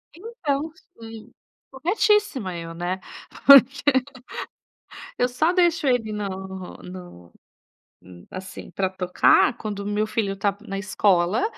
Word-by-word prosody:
Então, 325 - -3 0.3
sim. 225 -1 -11 0.4
Corretíssima 345 - +1
eu, 165 0 -7
né. 175 +3 -3 0.5
Porque 275 0 +8 1.4
eu 245 - +2
só 310 +8 +1
deixo 345 -4 +2
ele 245 -4 +1
no 190 -2 -6
no 175 - -11 0.7
hum, 90 -1 -15
assim 185 0 -9
pra 190 -1 -1
tocar, 185 +5 +3
quando 210 -2 -5
o - - -7
meu 210 +1 -1
filho 215 -2 -1
tá 200 0 -1
na 195 - -4
escola, 195 - +1
210 Hz, 120 wpm, -23 LUFS, 185-275 Hz, 1.4 s, Porque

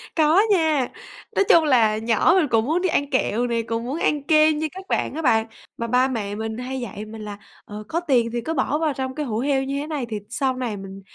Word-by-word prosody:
Có 320 +4 +5
nha. 315 -8 +2 0.5
Nói 395 - +3
chung 330 - +7
là 230 -7 +3
nhỏ 225 +8 +3
mình 335 -5 +3
cũng 225 -3 +2
muốn 325 +6 0
đi 375 - +1
ăn 285 -2 0
kẹo 245 -3 0
này, 230 -1 -1
cũng 230 0 -3
muốn 285 +6 -3
ăn 295 -2 0
kem 310 0 +4
như 315 - -1
các 380 +1 -10
bạn - - 0
á 320 - -3
bạn. 225 -5 +2 0.3
Mà 235 - -3
ba 250 +2 +3
mẹ 210 -6 -3
mình 220 0 -4
hay 260 +2 -4
dạy 210 -2 -6
mình 220 0 -9
là, 205 -1 -7 0.3
ờ, 210 +1 -8
có 335 - -1
tiền 255 -9 +1
thì 240 - -1
cứ 320 +7 -3
bỏ 295 - 0
vào 315 -2 0
trong 260 -1 -4
cái 300 - -3
hũ 220 -4 -2
heo 270 +1 +1
như 275 +1 -3
thế 295 - -6
này 295 -6 -3
thì 215 - -3
sau 260 +1 -1
này 235 -5 -3
mình 195 0 -9
260 Hz, 260 wpm, -23 LUFS, 225-305 Hz, 0.5 s, chung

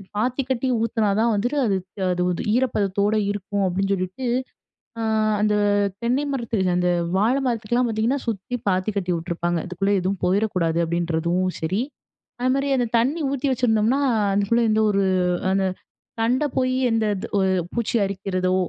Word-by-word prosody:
பாத்தி 250 +5 0
கட்டி 260 0 0 0.2
ஊத்துனா 225 -3 +1
தான் 230 0 +3
வந்துட்டு, 245 +8 -1
அது 200 -3 +1 0.4
அது 180 0 0 0.3
ஈரப்பதத்தோடு 210 -4 +1
இருக்கும் 205 0 -2
அப்படின்னு 195 +2 -1
சொல்லிட்டு, 185 +7 -3 0.8
அ - - -2 0.4
அந்த 210 0 +2 0.5
தென்னை 260 +5 +1
மரத்துல 220 -8 0
அந்த 180 0 +2 0.3
வாழை 245 +7 +2
மரத்துக்லாம் 240 +1 0
பார்த்தீங்கன்னா, 225 +5 0
சுத்தி 225 +3 -3
பாத்தி 185 +3 0
கட்டி 180 -2 -1
விட்டுருப்பாங்க. 170 0 -2
இதுக்குள்ள 195 +3 0
எதுவும் 190 +1 -2
போயிறக்கூடாது, 185 -4 +1
அப்படின்றதும் 170 +2 0
சரி. 190 +8 0 0.6
அதே 255 +1 +2
மாதிரி 275 +1 0
அந்த 245 -2 +1
தண்ணி 280 +8 +1
ஊத்தி 280 0 -2
வச்சிருந்தோம்னா 240 0 +2 0.3
அதுக்குள்ள 205 +4 +2
இந்த 215 0 +2
ஒரு, 200 -1 +2 0.5
அந்த 195 0 +2 0.6
தண்ட 250 +5 +2
போய், 255 0 +1 0.2
எந்த 225 -1 +1 0.2
த் - - -3
ஒரு 190 0 +2 0.2
பூச்சி 235 0 -1
அரிக்கிறதோ, 185 -1 -1
210 Hz, 145 wpm, -23 LUFS, 185-240 Hz, 0.8 s, தான்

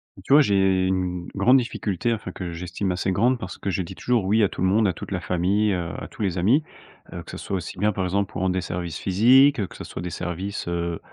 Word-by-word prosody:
Bah 95 - -13
tu 140 - +2
vois? 150 - +8
J'ai 95 -5 +2
une 90 -2 -2
grande 120 +7 +5
difficulté, 115 -3 -1
enfin, 105 -4 -5
que 90 -1 -6
j'estime 90 +3 -3
assez 90 +1 -1
grande 120 +7 +2
parce 95 -4 -7
que - - -4
je 95 - -1
dis 85 - -8
toujours: 120 -5 0
«Oui» 105 +4 +3
à 100 - +3
tout - - -7
le 95 - +3
monde, 105 +3 +3
à 95 - 0
toute - - -9
la 95 - -1
famille, 95 +4 +1
heu, 85 -2 -3
à - - -6
tous - - -11
les 95 -2 -1
amis, 120 - +3 0.5
que - - -7
ce - - -7
soit 95 - -3
aussi 90 - -7
bien, 105 +3 +2
par 95 -2 -2
exemple, 100 +2 -1
pour - - -5
rendre 95 -1 +1
des 95 - -1
services 85 -2 -4
physiques, 125 +8 +5
heu, 100 - -1
que - - -14
ce - - -8
soit - - -7
des 90 - -4
services, 90 +4 -4
heu, 85 -1 -2
95 Hz, 270 wpm, -24 LUFS, 90-105 Hz, 0.5 s, vois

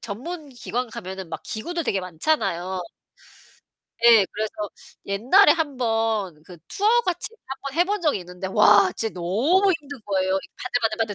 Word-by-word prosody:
전문 290 - -6
기관 245 -1 -4
가면은 190 -3 -7
막 165 - -6
기구들 335 +10 -4
되게 200 -6 0
많잖아요. 185 - -1 1.2
네. 230 -4 +7
그래서 215 +1 -3 0.5
옛날에 245 - +5
1 305 -5 -2
번 225 -8 -1
그 175 0 -13
투어 405 - -1 0.2
같이 360 -4 -1 0.2
1 270 0 -6
번 275 - -4
해 - - +6
본 415 +2 -1
적이 305 -9 +1
있는데 180 +1 -7
와 205 -1 +5
진짜 225 -1 -1
너무 260 - +2
힘든 285 -1 -10
거예요, 190 -1 0
이 195 - -5
바들바들바들 225 -3 -1
225 Hz, 295 characters per minute, -23 LUFS, 190-285 Hz, 1.2 s, 네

